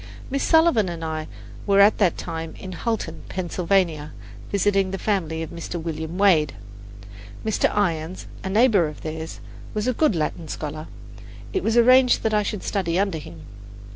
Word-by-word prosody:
Miss 275 0 0
Sullivan 320 - +4
and 165 -1 -5
I 155 -1 -3 0.4
were 200 0 +4
at 205 +2 +6
that 185 -5 +3
time 160 0 -5
in 190 - -8
Hulton, 185 -4 -3
Pennsylvania, 175 -4 0 0.4
visiting 195 -1 +2
the 195 - -3
family 165 -6 -1
of 160 - -8
Mr. 170 +1 -5
William 160 +1 -5
Wade. 170 -8 +4 0.9
Mr. 220 - +2
Irons, 175 -3 -1 0.2
a 190 - -3
neighbour 210 -4 +4
of 150 - -9
theirs, 160 0 -6 0.3
was 210 +2 -1
a 255 - +2
good 275 - +2
Latin 160 +1 -2
scholar; 155 +1 -5 0.7
it 380 - 0
was 225 -4 +1
arranged 255 +1 +5
that 220 - +1
I 210 - +3
should 205 -1 -4
study 180 -4 -1
under 195 -4 0
him. 85 - -11
185 Hz, 165 wpm, -23 LUFS, 160-210 Hz, 0.9 s, at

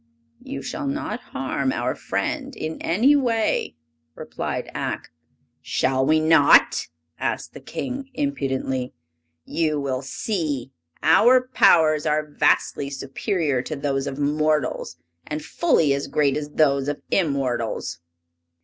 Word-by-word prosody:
"You 135 - -6
shall 280 - -4
not 280 +3 -3
harm - - -2
our - - -1
friend 275 -3 -3
in 155 +1 -5
any 235 +12 +4
way!" 230 - 0 0.4
replied - - -4
Ak. - - -4 0.5
"Shall 130 0 0
we 155 +3 +3
not?" 155 -2 +5 0.3
asked - - -3
the - - -9
King, 265 +1 -5
impudently. 135 - -2 0.5
"You 155 -3 0
will 130 -2 -2
see! 140 - -3 0.3
Our 250 +10 +5
powers 155 -2 +5
are 150 0 +1
vastly 145 -1 +1
superior 140 - -1
to 155 - -5
those 140 -1 -1
of 135 - -4
mortals, 150 - 0 0.3
and 150 0 -4
fully 165 - +2
as 140 0 -2
great 140 -3 +1
as 150 -1 -3
those 140 -3 +2
of 145 0 -3
immortals." 135 - -1
150 Hz, 120 wpm, -23 LUFS, 135-175 Hz, 0.5 s, not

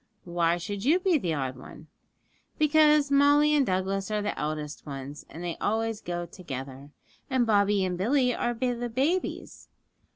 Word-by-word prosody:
'Why 170 -1 +1
should 195 +3 -5
you 310 +8 +4
be 365 -4 +2
the 170 -8 -1
odd 130 -2 -3
one?' 140 +4 -12 0.7
'Because 300 -1 +4
Molly 290 +2 +5
and 290 -2 +4
Douglas 190 -1 -1
are 210 -1 -1
the 205 - -2
eldest 150 0 -4
ones, 140 +1 -8
and 165 - -9
they 175 -1 -4
always 225 0 -1
go 175 0 -4
together, 140 -5 -8 0.4
and 260 -3 +2
Bobby 205 -2 +3
and 180 -1 -3
Billy 250 +4 +2
are 240 +1 -1
the 245 0 -2
babies. 285 +10 -2
205 Hz, 160 wpm, -27 LUFS, 170-265 Hz, 0.7 s, Molly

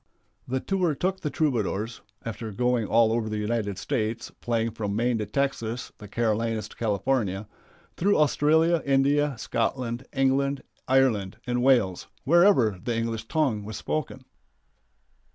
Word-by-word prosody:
The 130 +1 -1
tour 180 -2 0
took 190 +6 -1
the 150 - -2
Troubadours 115 - -1 0.2
after 115 0 -5
going 125 +1 +1
all 115 0 +4
over 115 -1 0
the 110 - -2
United 105 -2 -1
States, 110 +2 -2
playing 115 -1 0
from 105 -2 -3
Maine 120 +1 +1
to 105 - -3
Texas, 125 -1 -2
the 105 - -9
Carolinas 115 0 -1
to - - -14
California 105 -2 -1 0.5
through 200 +4 +3
Australia, 160 +2 +3
India, 140 0 +2
Scotland, 120 +2 -2
England, 135 0 +1 0.2
Ireland, 125 -8 +2
and 125 0 0
Wales, 120 -9 +2 0.2
wherever 140 - +4
the 120 -2 -1
English 115 -1 -3
tongue 135 -10 0
was 110 +1 -6
spoken. 135 -4 -4
120 Hz, 135 wpm, -26 LUFS, 110-140 Hz, 0.5 s, all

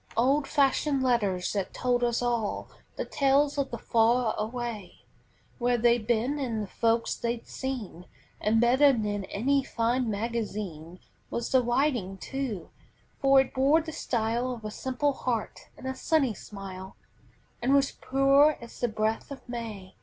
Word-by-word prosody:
Old 275 +4 +3
fashioned 280 -1 +2
letters 205 -8 +1
that 200 -2 -3
told 245 -1 +1
us 240 0 +1
all 235 -4 -1 0.3
The - - -3
tales 280 +1 +2
of 275 - 0
the 235 - -5
far 230 +1 +2
away; 225 -3 -5 0.6
Where 245 0 +2
they'd 235 -1 +2
been 240 +5 +1
and 230 -6 -2
the - - -6
folks 230 +3 +1
they'd 235 0 -3
seen; 235 -10 -5 0.3
And 220 +2 +2
better 260 +4 +5
than 205 -4 -2
any 275 +9 +1
fine 240 0 0
magazine 205 -6 -4 0.3
Was 235 - -3
the 260 - +5
writing 240 -6 0
too, 235 -7 -5 0.5
for 275 0 +6
it 265 - -5
bore 275 +5 +4
the 320 0 -6
style 235 -2 -1
Of 225 -2 -11
a 215 - -4
simple 265 +5 -1
heart 240 -4 -3
and - - -11
a 265 - -2
sunny 270 -2 +1
smile, 190 -2 -9 0.7
And 260 +3 +3
was 275 0 +3
pure 275 +3 +3
as 235 - -11
the 245 - +1
breath 215 0 -1
of 280 -2 -10
May. 220 -6 -7
240 Hz, 155 wpm, -28 LUFS, 215-270 Hz, 0.7 s, for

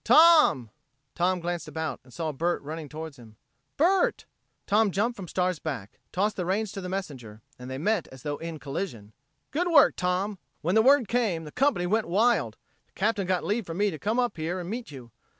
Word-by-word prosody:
"Tom!" 310 - +6 0.4
Tom 180 +1 +1
glanced 175 0 -3
about 160 -1 -4
and 125 - -19
saw 155 +6 -3
Bert 170 +5 0
running 155 0 -6
toward 155 0 -7
him. 110 -3 -15 0.4
"Bert!" 385 - +2 0.4
Tom 210 +1 +3
jumped 215 +6 0
from 190 -3 -8
Star's 180 -1 0
back, 125 -12 -6
tossed 205 +3 0
the 180 - -1
reins 205 +2 0
to 195 - -6
the 180 - -5
messenger 130 - -6 0.2
and 125 +1 -8
they 130 - -4
met 205 +4 0
as 130 -1 -14
though 145 -1 -3
in 165 -1 -6
collision. 135 - -5 0.4
"Good 345 +5 0
work, 330 -4 +6
Tom! 185 +2 -1 0.2
When 175 +4 0
the 220 - +6
word 265 -1 +5
came, 210 -8 0
the 150 - -9
company 270 - +1
went 215 +3 +1
wild. 225 +7 +2 0.3
The - - -40
Captain 205 -2 0
got 185 -1 +1
leave 210 0 -1
for 165 - -5
me 205 +2 +1
to 155 - -7
come 215 +3 -1
up 245 -6 0
here 165 +4 -2
and 175 - -6
meet 240 +1 -5
you. 130 -5 -11
180 Hz, 205 wpm, -27 LUFS, 155-215 Hz, 0.4 s, Tom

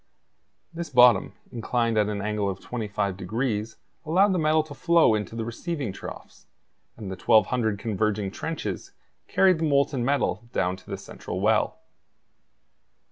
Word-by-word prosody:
This 170 -1 -5
bottom, 125 -3 +5 0.2
inclined 115 -1 -1
at 105 -1 +2
an 100 -1 -3
angle 105 -1 -1
of 95 0 -5
25 105 -5 -3
degrees, 110 +3 -2 0.3
allowed 190 +5 +3
the 180 - +1
metal 155 0 +3
to 155 -2 -10
flow 170 -4 +4
into 105 +1 -3
the 115 -1 -3
receiving 125 - -4
troughs; - - -10 0.5
and 105 -4 -6
the - - -4
1,200 110 +1 +2
converging 105 -1 -1
trenches 110 - -5 0.3
carried 185 -3 +3
the 160 - 0
molten 140 -2 +2
metal 120 -4 0
down 90 +2 0
to - - -17
the - - -3
central - - -7
well. - - +2
115 Hz, 145 wpm, -26 LUFS, 105-145 Hz, 0.5 s, bottom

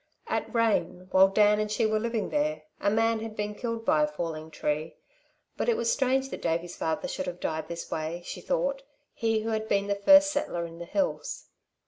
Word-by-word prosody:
At - - -2
Rane, 205 -6 0
while 190 +1 +7
Dan 210 +2 +4
and 215 0 -1
she 220 +2 +1
were 215 0 +2
living 230 -2 -2
there, 300 +1 0 0.2
a 200 - +2
man 225 +1 +2
had 220 -1 -6
been 210 0 -2
killed 230 +1 -4
by 155 - +4
a 150 - +3
falling 155 +1 -5
tree, 155 +1 -2 0.6
but - - 0
it 470 - +3
was 230 - +1
strange 265 0 +1
that - - -6
Davey's 170 +2 -1
father 160 -1 -2
should - - -4
have 180 0 -5
died 160 -1 -2
in - - -21
this 170 0 -6
way, 160 +2 -3
she - - -6
thought, - - -1 0.3
he 225 -1 0
who 225 - -3
had 220 0 -1
been 200 -1 +1
the 200 - 0
first 290 +9 +6
settler 175 -12 -2
in 165 0 -10
the 170 - -6
hills. 285 - -2
210 Hz, 215 wpm, -28 LUFS, 170-230 Hz, 0.6 s, while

